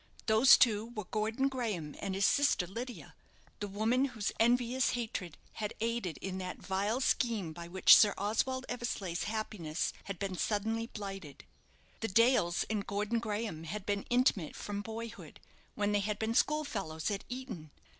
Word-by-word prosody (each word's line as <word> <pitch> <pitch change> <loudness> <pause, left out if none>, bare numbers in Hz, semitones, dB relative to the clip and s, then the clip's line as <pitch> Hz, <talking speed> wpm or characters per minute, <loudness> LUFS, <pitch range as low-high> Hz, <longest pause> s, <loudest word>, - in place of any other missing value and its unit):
Those 225 +3 +7
two 220 -3 +3
were 215 - -3
Gordon 220 +7 0
Graham 215 - -3
and 195 -1 -3
his 195 0 +2
sister 280 -10 +3
Lydia 235 +7 -7 0.5
the 205 - -3
woman 220 +6 +1
whose 225 -7 -2
envious 245 +2 +3
hatred 220 -8 -4 0.2
had 210 -2 -4
aided 230 -6 -2
in 190 -1 -3
that 185 -1 -5
vile 200 +5 -1
scheme 225 -10 0
by 170 +1 -8
which 185 +2 +8
Sir 205 -2 +5
Oswald 255 +6 0
Eversleigh's 205 -8 -3
happiness 205 -7 -2
had 195 -2 -5
been 195 -1 -3
suddenly 225 +4 -1
blighted. 195 - -8 0.5
The 225 - -1
Dales 225 -5 +3
and 210 -2 -2
Gordon 210 +3 0
Graham 210 -7 -3
had 190 +4 -5
been 200 -1 -2
intimate 245 - +2
from 205 0 -4
boyhood, 225 +2 -8 0.4
when 205 0 0
they 205 - +3
had 205 +1 -1
been 220 +1 -1
school 300 +5 +2
fellows 190 - -3
at 200 - -3
Eton. 245 - -6
210 Hz, 160 wpm, -32 LUFS, 195-235 Hz, 0.5 s, which